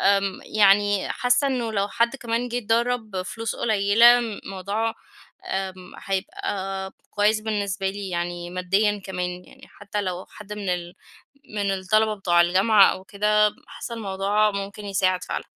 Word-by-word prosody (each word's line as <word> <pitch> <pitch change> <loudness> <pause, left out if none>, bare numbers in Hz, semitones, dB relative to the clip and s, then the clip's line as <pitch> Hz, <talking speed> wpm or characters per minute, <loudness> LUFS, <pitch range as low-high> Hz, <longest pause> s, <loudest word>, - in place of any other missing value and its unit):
آمم 195 -1 +2
يعني 205 -1 +3
حاسّة 250 +3 +2
إنّه 240 -4 -1
لو 200 -1 0
حد 235 +5 +1
كمان 235 0 -2
جه 240 +1 -2
اتدرّب 225 -3 0
فلوس 225 +5 -5
قليّلة 225 +3 +5 0.2
موضوع، 200 +4 -2 0.5
آمم، 185 -1 -4
هيبقى 195 - -3 0.2
كويّس 210 +1 +2
بالنسبة 200 -3 -2
لي 200 0 -6
يعني 175 0 -3
ماديًا 195 +3 +1
كمان، 180 -1 -4
يعني - - -17
حتّى 205 +1 -5
لو 185 -1 -4
حد 210 -1 -9
من 205 -3 -4
ال 175 -1 -3 0.6
من 200 -1 0
الطلبة 215 +3 +1
بتوع 175 -4 +3
الجامعة 195 +4 +5
أو 185 - -6
كده 210 +1 +2 0.2
حاسّة 235 - -7
الموضوع 205 0 +1
ممكن 200 +1 -6
يساعد 185 -2 +1
فعلًا. - - -4
200 Hz, 140 wpm, -24 LUFS, 190-220 Hz, 0.6 s, قليّلة